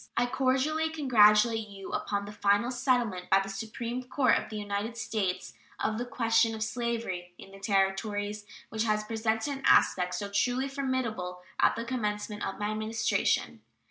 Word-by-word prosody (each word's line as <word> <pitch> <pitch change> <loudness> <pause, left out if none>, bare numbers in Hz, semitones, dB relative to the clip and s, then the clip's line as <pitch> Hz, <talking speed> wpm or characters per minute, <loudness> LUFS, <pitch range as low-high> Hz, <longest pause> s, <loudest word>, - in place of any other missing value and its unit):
I 240 - +4
cordially 270 +5 +1
congratulate 225 -6 +4
you 195 -1 -9
upon 200 -1 -2
the 205 - -8
final 205 +3 +2
settlement 240 -8 0
by 195 - +6
the 195 0 -4
Supreme 230 +5 -4
Court 255 -1 +3
of - - -2
the 220 - -7
United 205 +3 -3
States 215 -5 -2 0.3
of 215 +1 -1
the 245 - -3
question 225 -2 +2
of 220 - -2
slavery 220 -6 -3
in 195 - -13
the 195 - -12
Territories, 205 +1 0 0.2
which 220 0 -1
had 215 -1 +1
presented 225 +5 -1
an - - -14
aspect 180 -1 +4
so 200 +3 -3
truly 250 +6 +1
formidable 240 -10 -2 0.2
at - - +4
the 230 - -4
commencement 210 -3 -3
of 195 - -3
my 210 0 -2
Administration. 215 +1 0
220 Hz, 165 wpm, -29 LUFS, 205-245 Hz, 0.3 s, by